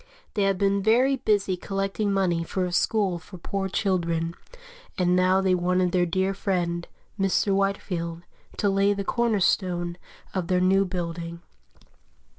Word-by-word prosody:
They 210 - 0
had 195 -1 +1
been 200 +1 +2
very 250 +6 +3
busy 205 -5 +1
collecting 195 +2 -2
money 180 -4 +1
for 185 +2 -2
a 180 - -3
school 190 -1 +1
for 185 +2 -12
poor 195 +2 -3
children, 170 -4 0 0.6
and 180 -1 +2
now 185 +1 +3
they 190 -1 +2
wanted 180 0 +1
their 180 -1 +2
dear 190 +3 0
friend, 175 -4 -1 0.3
Mr. 195 +1 +2
Whitefield, 180 -4 -1 0.3
to 205 - +1
lay 195 +1 +3
the 200 0 -3
corner 230 0 +1
stone 175 -2 0 0.4
of 185 -3 -2
their 180 -1 +2
new 190 +2 +3
building. 170 -2 -5
185 Hz, 150 wpm, -25 LUFS, 175-195 Hz, 0.6 s, very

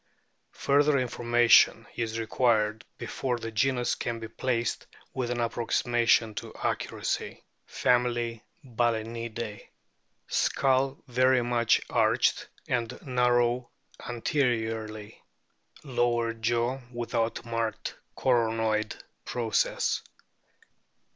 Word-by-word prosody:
Fur 140 +1 +3
ther 145 -1 +3
information 120 -2 +4
is 115 -1 -3
required 110 -1 +1
before 125 -2 -2
this 115 -1 -6
genus 125 +1 +1
can 120 -1 -3
be 115 - -6
placed 120 +1 -2 0.3
with 125 -2 -2
an 120 0 -2
approximation 115 -1 +2
to - - -6
accuracy. - - -3 0.2
FAMILY, 120 -2 0 0.2
BAL&NIDAE 115 -2 -3 0.6
Skull 135 +1 +1
very 130 0 +3
much 120 -1 +2
arched, - - +2 0.2
and 120 -3 -2
narrow 125 -1 +2 0.3
anteriorly; 115 -4 -2 0.6
lower 120 -3 0
jaw 120 +3 0
without 120 -1 -2
marked 115 -1 -3 0.2
coronoid 115 -3 +1 0.3
process. 115 -3 0
120 Hz, 90 wpm, -28 LUFS, 115-125 Hz, 0.6 s, information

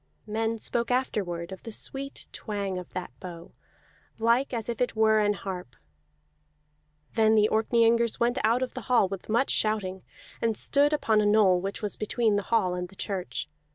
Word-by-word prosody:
Men 225 +1 -1
spoke 235 +2 -1
afterward 195 -9 -1
of 190 - -8
the 225 - -8
sweet 275 +5 -4
twang 200 -4 -3
of 180 - -10
that 185 - -5
bow, 175 -3 -9 0.7
like 235 +4 +2
as 230 -3 -3
if 235 -1 -4
it 250 - 0
were 220 0 +4
an 210 -1 +3
harp. 180 - -6 1.4
Then 220 -1 +4
the 210 -1 +5
Orkneyingers 230 +1 +3
went 240 +1 +1
out 230 +4 +3
of 255 - -4
the 255 - -6
hall 240 -6 +4
with 195 +1 -7
much 235 +5 +2
shouting, 195 -4 0 0.4
and 225 -2 +1
stood 285 +1 +3
upon 220 -8 +2
a - - +1
knoll 205 -4 +4
which 195 +3 -5
was 205 - -3
between 220 0 +1
the 205 - +1
hall 185 -6 +2
and 180 0 -3
the 195 - -16
church. 190 -2 -4
215 Hz, 180 wpm, -27 LUFS, 195-235 Hz, 1.4 s, the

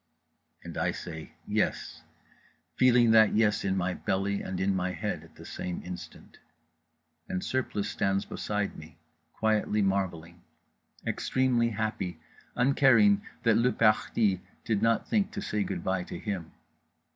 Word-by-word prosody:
_" - - -23
and - - -5
I - - +1
say 80 -2 -8
Yes, - - -1 0.7
feeling 125 -2 +5
that 110 -2 +6
Yes 110 -1 +2
in 95 -1 0
my 90 0 0
belly 100 +2 -1
and 95 -1 -4
in 95 +1 +1
my 90 0 -1
head - - -3
at - - -18
the - - -12
same 90 -1 -5
instant; 90 0 -9 0.9
and 90 - -2
Surplice 125 -6 -1
stands 95 0 0
beside 105 -1 -3
me, 80 0 -12 0.3
quietly 110 -1 +1
marvelling, 85 -3 -2 0.6
extremely 125 -3 +1
happy, 105 -5 -3 0.4
uncaring 140 +11 +5 0.2
that 115 -2 +4
le 125 +2 +3
parti 105 -3 +2 0.2
did 105 -3 0
not 115 0 +2
think 215 -3 +1
to - - -4
say 105 - -1
good 95 -3 -4
bye 95 -1 0
to - - -7
him. 95 -6 -4
105 Hz, 145 wpm, -29 LUFS, 95-115 Hz, 0.9 s, that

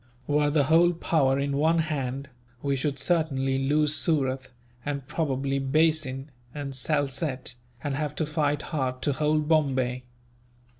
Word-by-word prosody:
Were 145 +1 +2
the 145 -1 +3
whole 165 +5 +5
power 145 -5 +2
in 140 0 -1
one 160 +3 +3
hand, 140 -4 -2 0.4
we 140 -1 +1
should 140 +1 -1
certainly 135 -4 +1
lose 150 +2 +2
Surat, 135 -4 0 0.3
and 140 -2 -3
probably 135 -2 -1
Bassein 140 -1 +1 0.2
and 140 -2 -4
Salsette, 140 -1 -1 0.3
and 145 -2 -1
have 150 +1 -2
to 155 - 0
fight 150 -1 0
hard 130 -5 -2
to 145 - +1
hold 150 +1 +1
Bombay. 130 -5 +1
145 Hz, 140 wpm, -27 LUFS, 135-155 Hz, 0.4 s, whole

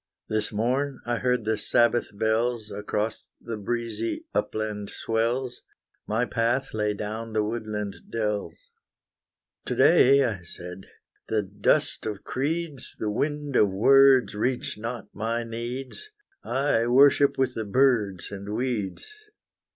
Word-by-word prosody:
This 110 -1 -1
morn 130 +5 -1
I 120 0 0
heard 125 -3 0
the 110 -1 0
Sabbath 120 0 +3
bells 110 +1 0
Across 105 +2 -3
the 115 -1 -5
breezy 115 - -3
upland 105 -2 -2
swells; 120 +3 -1 0.5
My 110 +3 +1
path 120 +3 0
lay 105 -1 0
down 110 +2 -5
the 110 -1 +2
woodland 105 -2 -4
dells. 110 - -3 0.9
To - - -2
day, 140 -4 +6
I 110 -7 -2
said, 90 +2 -9 0.4
the 110 -1 +1
dust 100 +2 +1
of 105 -2 -5
creeds, 150 +1 -3
The 105 - -2
wind 145 +3 -2
of 105 - +5
words 135 +6 +5
reach 120 +5 -1
not 115 +1 -6
my 115 +2 -2
needs; 120 - -6 0.3
I 130 -4 +1
worship 140 +3 +5
with 130 -1 +1
the 110 - -3
birds 105 -5 +1
and 100 +1 -5
weeds. 115 -5 -2
115 Hz, 130 wpm, -26 LUFS, 105-130 Hz, 0.9 s, day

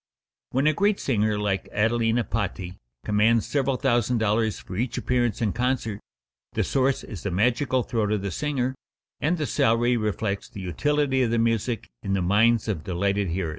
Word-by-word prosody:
When 135 +3 0
a 155 - +4
great 200 +5 +2
singer 110 -4 +1
like 100 -2 -1
Adelina 115 +2 +1
Patti 95 -5 -4 0.3
commands 110 +2 +3
several 135 -2 0
thousand 120 -2 +1
dollars 110 0 +1
for 95 - -9
each 120 +4 -2
appearance 120 -3 0
in 105 - +1
concert, 120 -4 -1 0.5
the - - +1
source 135 0 +1
is 95 -7 -8
the 100 - -2
magical 125 +7 +1
throat 110 -3 -1
of 105 -2 0
the 100 - -2
singer, 130 - -1 0.5
and 175 +4 +1
the 155 - -1
salary 120 0 +2
reflects 105 -2 -2
the 100 - -8
utility 135 - +1
of 125 - +2
the 115 - +1
music 115 0 0
in 95 - -2
the 95 - +1
minds 110 +5 +3
of 95 -8 -2
delighted 100 +3 0
hearers. 85 0 -2
115 Hz, 175 wpm, -25 LUFS, 100-125 Hz, 0.5 s, a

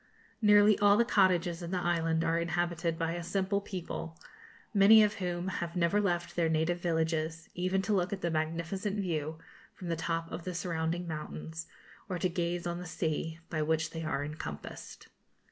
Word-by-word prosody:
Nearly 210 -1 +6
all 205 0 +6
the 235 - +4
cottages 180 -4 +3
in 170 - -5
the 185 - -1
island 165 -2 +1
are 165 0 +2
inhabited 170 -1 -1
by 165 0 -1
a 175 +1 -3
simple 195 +3 0
people, 175 -4 -6 0.5
many 210 +2 +8
of 210 0 +2
whom 175 0 -2
have 170 0 -4
never 180 +4 +2
left 175 -3 -1
their 170 -2 +2
native 160 +2 +1
villages, 160 -1 -1
even 185 +2 0
to 210 +3 0
look 185 -2 +1
at 195 -1 -3
the 170 - 0
magnificent 170 +6 -2
view 160 -4 -2 0.4
from 180 - -7
the 165 - +1
top 165 0 -2
of 170 - -5
the 180 0 -4
surrounding 170 0 -2
mountains, 160 +1 -6 0.4
or 185 - -1
to 185 +1 +1
gaze 175 0 -2
on 175 0 -2
the 180 - -7
sea, 160 0 -2
by 155 -2 0
which 160 +1 0
they 165 0 -5
are 145 -2 -1
encompassed. 110 - -7
170 Hz, 180 wpm, -31 LUFS, 160-185 Hz, 0.5 s, many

